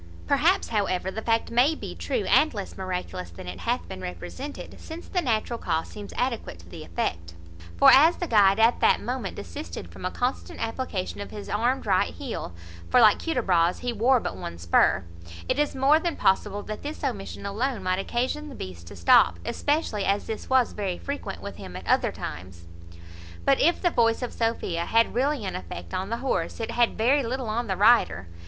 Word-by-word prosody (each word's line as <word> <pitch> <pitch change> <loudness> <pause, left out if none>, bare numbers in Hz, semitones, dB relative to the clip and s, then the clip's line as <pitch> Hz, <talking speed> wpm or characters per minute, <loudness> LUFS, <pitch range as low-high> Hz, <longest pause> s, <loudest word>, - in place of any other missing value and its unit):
Perhaps, 330 +8 +2
however, 190 -4 0
the 220 - -5
fact 225 0 0
may 255 +7 +4
be - - -7
true, 460 - -2
and 310 -6 +4
less 200 -2 -6
miraculous 180 - -4
than 85 +1 -11
it 90 0 -6
hath 85 -1 -2
been 95 - -8
represented; 90 - -7
since 325 +1 -9
the 360 - 0
natural 235 -3 -1
cause 165 -2 -1
seems 205 -1 -9
adequate 245 -2 -2
to - - -16
the 165 -3 -9
effect: 85 - -3 0.4
for, - - +8
as 315 +6 +6
the 350 - -2
guide 205 - +4
at 225 +2 +4
that - - +4
moment 245 -5 -4
desisted 85 0 -7
from 85 - -11
a 185 - 0
constant 245 +6 -3
application 225 -5 -3
of 200 - -6
his 205 -1 -8
armed 240 +6 0
right - - +1
heel 265 - -5 0.4
(for, 250 - +5
like 215 -3 +6
Hudibras, 185 - +1
he 245 -1 -2
wore 245 +4 +3
but 90 - -4
one 85 -2 -7
spur), 85 +2 +3 0.4
it - - 0
is 295 -1 +1
more 275 +4 +4
than 335 -1 -2
possible 205 +1 +1
that 215 0 -6
this 300 +2 -6
omission 210 -8 -4
alone 220 +2 -2
might 185 0 0
occasion 255 +8 -2
the 275 - -9
beast 85 - -8
to 100 - -10
stop, 85 0 +5
especially 290 -9 -1
as 200 +1 +1
this 220 - -6
was 260 -2 +3
very 190 -4 -3
frequent 280 -8 -6
with 200 - -7
him 90 -1 -9
at - - -7
other - - +2
times. 85 +2 -8 0.8
But 275 -1 +4
if 340 +4 +3
the 350 - +1
voice 230 -1 +2
of 245 - -4
Sophia 205 -7 -1
had 230 0 +3
really 265 -1 0
an 190 - -3
effect 85 -1 -7
on 190 +2 -2
the 230 - -1
horse, - - -1
it 225 - -3
had 240 -1 +2
very 260 +6 +3
little 250 -1 -3
on 235 +2 -1
the 190 -2 -1
rider. 200 - +4
220 Hz, 200 wpm, -26 LUFS, 180-260 Hz, 0.8 s, for